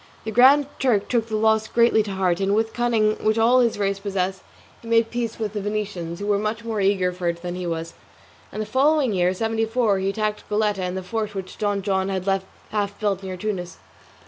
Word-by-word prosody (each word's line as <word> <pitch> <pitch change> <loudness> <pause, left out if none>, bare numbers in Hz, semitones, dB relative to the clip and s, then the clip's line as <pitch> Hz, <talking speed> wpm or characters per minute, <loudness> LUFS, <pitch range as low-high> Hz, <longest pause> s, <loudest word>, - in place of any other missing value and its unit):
The 220 - -4
Grand 265 +6 +6
Turk 235 -7 +1
took 230 -2 +1
the 220 - -3
loss 220 0 +2
greatly 235 -2 +4
to 205 -2 -4
heart, 185 -2 +1
and 195 +1 +1
with 225 +1 +1
the - - -22
cunning 225 -3 +1
which 215 +1 +2
all 235 +3 +5
his 235 -4 +2
race 200 -1 -1
possess, 190 -1 -2 0.4
he 230 - -12
made 230 0 +2
peace 235 -2 -3
with 215 -2 -3
the 210 - -3
Venetians 195 -5 -3
(who 205 - -4
were 205 -1 +2
much 215 +2 -3
more 220 -3 -2
eager 190 -2 +2
for 180 -1 -4
it 170 0 -2
than 175 0 -3
he 180 0 -4
was), 165 0 -4 0.6
and 215 - -3
the - - -7
following 275 0 +2
year, 180 -1 +2
seventy 225 +2 0
four, 225 -3 +1
he 190 +1 0
attacked 215 +1 -3
the 210 - -1
Goletta 210 -2 +1
and 180 0 -3
the 190 - -4
fort 210 +2 -3
which 190 -1 -6
Don 205 -2 0
John 190 0 0
had 190 -1 -2
left 195 -1 0 0.2
half 205 -1 -2
built 200 -3 0
near 190 -1 -6
Tunis. 180 -3 -4
210 Hz, 235 wpm, -23 LUFS, 190-225 Hz, 0.6 s, Grand